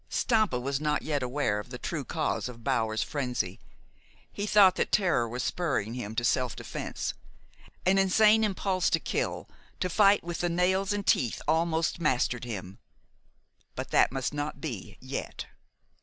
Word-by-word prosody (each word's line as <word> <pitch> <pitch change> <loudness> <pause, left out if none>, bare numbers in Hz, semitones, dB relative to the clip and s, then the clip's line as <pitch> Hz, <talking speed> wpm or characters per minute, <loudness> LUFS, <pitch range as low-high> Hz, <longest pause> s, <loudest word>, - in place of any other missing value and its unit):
Stampa 215 - +2
was 135 +3 -2
not 150 -1 0
yet 145 -3 -1
aware 125 -5 0
of 105 - -8
the - - -6
true - - -4
cause - - -2
of 115 -2 -11
Bower's 110 -1 0
frenzy. 125 -10 -3 0.7
He 205 +1 -4
thought 200 -2 +7
that - - 0
terror 175 - +2
was 125 +2 -3
spurring 135 - -1
him 110 -3 -5
to 120 - 0
self 125 0 +1
defense. - - -4 0.7
An 190 +1 +4
insane 215 +3 +5
impulse 190 -3 +1
to - - +2
kill, - - -2 0.3
to 185 - -1
fight 205 +1 +5
with 170 0 -4
the 175 - 0
nails 190 +3 +1
and 205 -1 -2
teeth, 120 -4 +2
almost 160 +1 +1
mastered 125 -5 0
him; 100 -5 -6 1.0
but - - -5
that - - +4
must 135 +1 -2
not 145 +1 -4
be 120 - -6
yet. - - -5
150 Hz, 160 wpm, -28 LUFS, 125-190 Hz, 1.0 s, thought